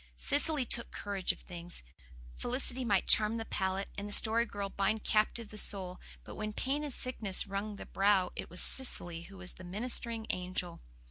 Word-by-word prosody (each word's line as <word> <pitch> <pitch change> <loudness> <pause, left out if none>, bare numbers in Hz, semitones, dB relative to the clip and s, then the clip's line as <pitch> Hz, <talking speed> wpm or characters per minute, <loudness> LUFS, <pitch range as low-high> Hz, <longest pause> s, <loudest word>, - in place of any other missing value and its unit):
Cecily 290 -1 +3
took 235 0 -1
charge 200 -2 0
of - - -11
things. 175 - -8 0.5
Felicity 255 - -1
might 200 -5 +2
charm 215 +1 +4
the 225 - -4
palate, 190 -1 -2
and 205 +1 -6
the - - -2
Story 230 +2 +6
Girl 200 -2 -4
bind 200 +2 -1
captive 215 +1 +1
the 215 - -7
soul; 185 -3 +2 0.2
but - - -10
when 215 0 -5
pain 275 +6 -2
and 295 - -4
sickness 225 -7 0
wrung 200 +1 -4
the - - -9
brow 195 -2 +2
it - - -6
was 180 - +3
Cecily 175 -10 0
who 195 - -12
was 185 -1 -5
the 185 - -13
ministering 225 +4 +1
angel. 180 -1 -4
205 Hz, 185 wpm, -32 LUFS, 190-235 Hz, 0.5 s, Story